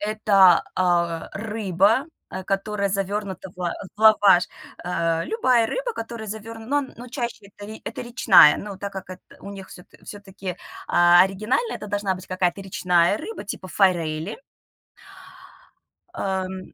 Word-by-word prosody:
Эта, 205 -4 +4
а, 170 -2 0
рыба, 215 - +1 0.2
э, 185 - -6
которая 200 +1 -1
завернута 195 -1 -3
в - - -25
ла 175 -2 -2 0.2
в - - -14
лаваш. 205 -4 +6 0.4
Э, 165 -2 -1
любая 255 - +2
рыба, - - -3
которая 225 -1 -6
заверн 220 +2 -8
ну, 290 +1 +1
но 245 - -10
чаще 240 -5 -5
это 205 +1 -11
это 225 - -6
речная, 240 -10 +6
но 200 -2 -7
так 200 +1 -6
как 190 -1 -8
эт 185 - -9 0.2
у 200 - -9
них 195 -1 -10
всё 180 - -13 0.2
всё-таки, 195 -3 -8 0.3
а, 175 0 +6
оригинально 215 - -1
это - - -7
должна 205 -2 -1
быть 185 - -12
какая-то 185 +1 -1
речная 180 -1 +2
рыба 390 - -7
типа 195 -2 -7
форели. 170 -1 0 1.8
Эм, 190 -1 -4
195 Hz, 145 wpm, -23 LUFS, 185-215 Hz, 1.8 s, лаваш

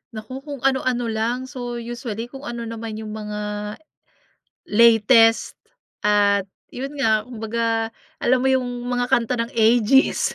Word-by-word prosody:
Naku, 220 +5 -7
kung 280 -2 -8
ano-ano 255 -3 +1
lang. 230 +3 -1
So, 245 -3 -5
usually 235 -1 -6
kung 275 +2 -9
ano 235 0 -5
naman 225 -1 -6
yung 215 0 -7
mga 210 0 -5 0.9
latest 225 +1 +5 0.5
at 205 -2 +3 0.2
yun 270 +3 -6
nga, 220 -4 +3
kumbaga 225 -1 -2 0.3
alam 255 +1 +2
mo - - +3
yung 260 -1 +2 0.2
mga 245 0 0
kanta 240 0 +2
ng 230 +1 -2
Aegis? 230 +3 +3
230 Hz, 135 wpm, -22 LUFS, 220-250 Hz, 0.9 s, latest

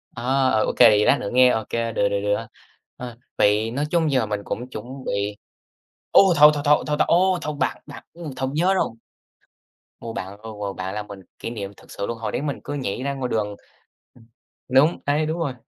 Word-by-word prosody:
À, 120 - -7 0.3
ờ, 110 -2 +2
OK, - - -2
vậy 105 -3 +7
lát 140 - +4
nữa 100 - -4
nghe 125 0 +6
OK, 110 -3 -1
được, 115 -1 -1 0.2
được, 100 0 -1
được. 105 +2 -1 0.5
Ờ, 120 -2 -8 0.2
vậy 105 +2 +2
nói 145 +4 -1
chung 165 -4 +2
giờ 130 -4 +2
mình 105 -1 -3
cũng 125 +5 -5
chuẩn 110 -2 -7 0.2
bị 100 +1 -2 0.7
ối! - - +8
Thôi, 150 +1 +9
thôi, 145 -1 -3
thôi, 150 0 +4
thôi, 150 - +1
thôi, - - +4
ố, 185 +1 +3
thôi, 150 -1 -4
bạn - - -1
bạn, 145 - -11
ừm, 165 -4 -7
thôi 130 0 -2
nhớ 180 +5 +2
rồi. 190 - +1 1.1
Ô, 115 -1 -6
bạn, 95 +2 -6
ờ, 110 0 -8
ờ, 100 -1 -3
bạn 95 +1 -5
làm 105 -1 -5
mình 100 -1 -9 0.2
kỷ - - -5
niệm 100 -4 -6
thực - - -17
sự 100 - -4
luôn, 115 - -4
hồi 110 - -4
đấy - - -2
mình 145 -2 -3
cứ 145 - -5
nhảy 130 -3 -3
ra 140 0 -1
ngoài 130 -2 -3
đường 105 -2 -1 0.6
ừm, 115 -2 -20 0.4
đúng, 140 +6 +4
đấy, 150 +2 +1
đúng 160 +2 -3
rồi. 140 -6 -1
120 Hz, 225 wpm, -23 LUFS, 105-145 Hz, 1.1 s, Thôi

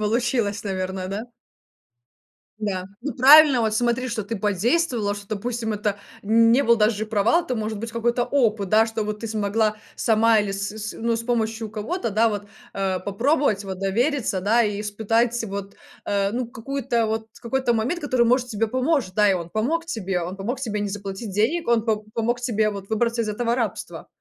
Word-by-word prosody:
получилось, 220 -1 0
наверное, 185 -1 -3
да? 200 +3 -3 1.4
Да, 195 -4 -3
ну 280 +3 -3
правильно, 280 0 +8
вот 220 -1 +1
смотри, 240 +2 +1
что 225 -2 -2
ты 225 +3 -4
подействовала, 210 - 0
что, 205 0 -10
допустим, 225 +2 -3
это 210 -1 -1 0.3
не 230 +5 +4
был 235 -3 +4
даже 215 0 +1
провал, 225 - +2
это 250 - -2
может 215 -1 -3
быть 230 +2 -5
какой-то 235 +2 0
опыт, 220 -8 +1
да, 220 +3 +4
что 225 -1 -3
вот 210 0 -4
ты 230 - -4
смогла 215 0 0 0.2
сама 225 0 +3
или 205 -1 0
с 200 +1 -3
с, 215 0 -5
ну, 230 0 0
с 230 - -4
помощью 225 -2 -1
кого-то, 230 - -3
да, 220 +3 +3
вот, 205 -2 -3 0.3
э, 190 -2 -1
попробовать, 215 +2 +1
вот 190 -1 -6
довериться, 225 +2 0
да, 220 +5 +3
и 205 -2 -1
испытать 225 +3 0
вот, 200 -1 -6 0.3
э, 200 -1 0
ну, 245 +3 -2
какую-то 235 0 -2
вот, 220 0 -2
какой-то 245 +1 0
момент, 235 +10 -1
который, 255 -5 +2
может, 250 +1 +2
тебе 225 0 -1
поможет, 255 - 0
да, 210 0 +4
и - - +3
он 170 -2 -5
помог 310 - -1
тебе, 195 - -2
он 180 +3 -5
помог 235 +7 -4
тебе 220 -5 -2
не 205 - -1
заплатить 200 +1 -6
денег, 245 - +1
он 235 -2 +3
п 220 -2 +2 0.2
помог 235 +2 0
тебе 220 -3 +1
вот 200 -1 -8
выбраться 230 +1 0
из 215 - -4
этого 230 +3 0
рабства. 230 -4 -4
220 Hz, 190 wpm, -23 LUFS, 205-240 Hz, 1.4 s, правильно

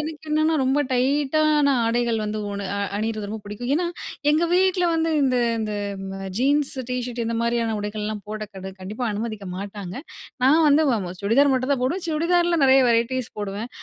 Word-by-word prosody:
எனக்கு 310 0 -6
என்னன்னா 310 +1 +2
ரொம்ப 265 +3 +2
டைட்டான 290 +3 +2
ஆடைகள் 235 0 +1
வந்து 215 0 -3
உன 200 -1 -4
அ - - -2 0.2
அணியிறது 215 -1 -3
ரொம்ப 220 +1 -5
பிடிக்கும். 210 +5 -5
ஏன்னா, 345 +3 +1 0.4
எங்க 315 +3 +3
வீட்டுல 370 0 +3
வந்து 325 0 +1
இந்த 260 -2 +2 0.2
இந்த 215 -1 -2 0.5
அ - - -4
ஜீன்ஸ் 280 +2 +2 0.2
டீ 250 - -1
ஷர்ட் 245 -1 -5
இந்த 230 0 -2
மாதிரியான 235 -1 0
உடைகள்லாம் 210 0 -4
போட 215 0 -5
கடு 190 0 -7
கண்டிப்பா 210 +6 -5
அனுமதிக்க 215 -2 -4
மாட்டாங்க! 200 -2 -6 0.5
நான் 305 +5 +5
வந்து 295 +2 +5
அ - - -1
அ - - -5
சுடிதார் 250 +8 +4
மட்டும் 255 +2 0
தான் 250 -3 -1
போடுவேன். 340 +9 -1
சுடிதார்ல 340 +2 +2
நெறைய 265 0 +6
வெரைட்டீஸ் 235 +1 0
போடுவேன். 205 +3 -4
250 Hz, 180 wpm, -23 LUFS, 215-295 Hz, 0.5 s, நெறைய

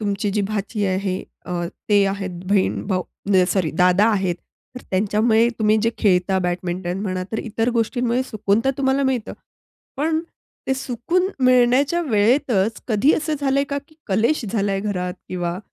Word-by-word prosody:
तुमची 205 -1 -1
जी 210 +1 0
भाची 210 0 -2
आहे 190 0 -1 0.3
अ, 180 - -5 0.4
ते 205 -1 +5
आहेत, 195 -1 -3 0.2
बहीण-भाऊ, 190 -1 +1 0.2
म्हणजे 190 -2 +4
सॉरी 180 -6 0
दादा 180 +3 +4
आहेत, 190 -4 0 0.4
तर 250 - -7
त्यांच्यामुळे 220 +4 +3
तुम्ही 215 -1 +3
जे 230 - +2
खेळता, 190 -2 +2
बॅडमिंटन 180 0 -2
म्हणा 185 -2 -2
तर 220 - -1
इतर 225 +1 -2
गोष्टींमुळे 240 +2 0
सुकून 215 -4 0
तर 270 - +3
तुम्हाला 270 0 +2
मिळतं. 260 -4 -1 0.6
पण 315 +3 +1 0.5
ते 265 - +1
सुकून 270 +8 -1 0.2
मिळण्याच्या 255 +6 +4
वेळेतच 220 -1 +2
कधी 235 +7 +3
असं 310 0 -1
झालंय 275 0 +2
का, 280 - 0
की 310 - -22
कलेश 230 +8 +1
झालाय 200 -2 0
घरात 180 -3 -3
किंवा 175 -1 -3
210 Hz, 155 wpm, -21 LUFS, 190-250 Hz, 0.6 s, ते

